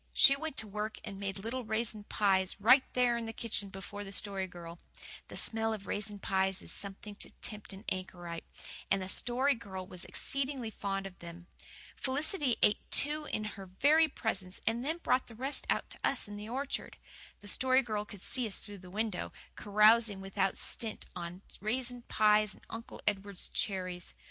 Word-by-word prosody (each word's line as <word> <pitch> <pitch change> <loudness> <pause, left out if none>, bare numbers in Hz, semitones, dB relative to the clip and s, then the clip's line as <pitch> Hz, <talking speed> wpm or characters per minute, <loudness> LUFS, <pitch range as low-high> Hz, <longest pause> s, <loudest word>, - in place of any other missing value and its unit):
She 275 -2 +8
went 310 0 -4
to 220 - -2
work 210 +2 -3
and 195 - -6
made 195 -1 -2
little 230 +6 -3
raisin 220 -1 0
pies, 190 -3 +2
right 250 +6 +8
there 245 -1 +4
in 230 - -3
the 225 - -3
kitchen 210 -3 +1
before 195 +2 -6
the 195 - -8
Story 195 -1 0
Girl. 170 -1 -9 0.5
The - - -6
smell 225 0 +1
of 205 -2 -6
raisin 210 0 -2
pies 190 -1 +1
is - - -6
something 200 +1 -6
to - - -6
tempt 210 -1 -3
an 195 +3 -10
anchorite; 175 -2 -4 0.5
and - - +4
the 185 - -3
Story 250 +8 +3
Girl 190 -6 -6
was 180 -1 -7
exceedingly 270 -4 -2
fond 195 -1 -2
of 190 -1 -8
them. 170 0 -9 0.5
Felicity 285 0 +1
ate 210 - +6
two 300 +2 +2
in 215 - -2
her 200 -2 -6
very 295 - +5
presence, 195 -9 -2
and 235 +2 +1
then 315 +5 0
brought 255 -6 +2
the 230 - -11
rest 270 +5 -2
out - - +1
to - - -4
us 275 - +2
in 205 - -7
the 210 +1 -6
orchard. 270 +3 -3 0.4
The 205 - -11
Story 260 +4 +3
Girl 215 -3 -1
could 205 -2 -11
see 250 -3 0
us 200 - -2
through 205 -1 -9
the 180 0 -12
window, 210 0 -2 0.2
carousing 215 0 +5
without 195 0 0
stint 225 -3 -1
on 175 +2 -6 0.2
raisin 245 +3 -1
pies 210 -1 +4
and - - -20
Uncle 230 +1 -7
Edward's 200 -2 -1
cherries. 185 -3 -2
210 Hz, 185 wpm, -33 LUFS, 195-240 Hz, 0.5 s, She